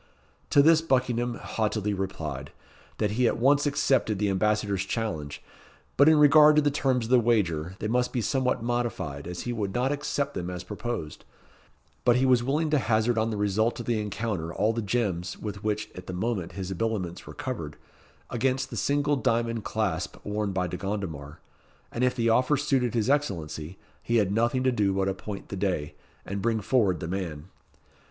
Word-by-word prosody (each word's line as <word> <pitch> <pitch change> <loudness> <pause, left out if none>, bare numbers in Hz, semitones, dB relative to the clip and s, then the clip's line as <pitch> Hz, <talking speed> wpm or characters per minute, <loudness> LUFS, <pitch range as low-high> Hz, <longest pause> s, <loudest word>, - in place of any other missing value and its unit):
To 140 - +6
this 160 +1 +6
Buckingham 125 -5 0
haughtily 105 -2 -2
replied, 80 -8 -4 0.5
that 105 - 0
he 120 +3 +2
at - - 0
once 140 +4 +3
accepted 135 -7 +1
the 100 0 +1
Ambassador's 100 0 +1
challenge; 80 -10 -4 0.5
but 140 +3 +6
in 160 - +5
regard 150 +1 +7
to 150 - +5
the 145 - +2
terms 130 -4 +1
of 115 - -6
the 130 - +7
wager, 95 -8 +1
they 105 - -3
must 125 +2 +1
be 125 - -1
somewhat 125 +1 0
modified, 115 -12 -2
as 90 0 -5
he 120 - -3
could 100 -4 -3
not 125 +3 +1
accept 145 -1 -2
them 90 0 -4
as 90 0 -5
proposed; 105 -7 -5 0.8
but 120 -1 +4
he 130 +1 +3
was 125 -2 +4
willing 150 +4 0
to 150 - +4
hazard 110 0 +1
on 110 +1 +1
the 110 - -3
result 105 +4 +1
of 120 - -5
the 115 -3 0
encounter 105 -5 -3
all 105 +5 +1
the 115 - -2
gems, 95 -5 -1
with 105 -1 -6
which 110 0 -1
at 90 - -10
the 95 - -5
moment 95 -2 -2
his 95 -2 -5
habiliments 95 -3 -3
were - - -9
covered, 125 - -5 0.5
against 130 +2 0
the 115 - -5
single 145 +6 +1
diamond 115 -4 0
clasp 110 -2 -2
worn 105 0 -1
by 95 -1 0
De 90 0 -4
Gondomar; 90 -7 -5 0.5
and 120 - -2
if 125 0 +2
the 115 -2 0
offer 125 +5 +3
suited 130 -5 0
his 115 -1 +1
Excellency, 90 - -1 0.2
he 120 - -1
had 105 -4 +3
nothing 120 +5 +1
to 130 - +3
do 105 -5 +1
but 95 0 0
appoint 100 +1 -5
the - - -4
day, 90 -6 -1 0.3
and 100 0 -4
bring 115 0 +1
forward 100 - +1
the 85 - -3
man. 85 -3 -4
110 Hz, 190 wpm, -27 LUFS, 95-125 Hz, 0.8 s, regard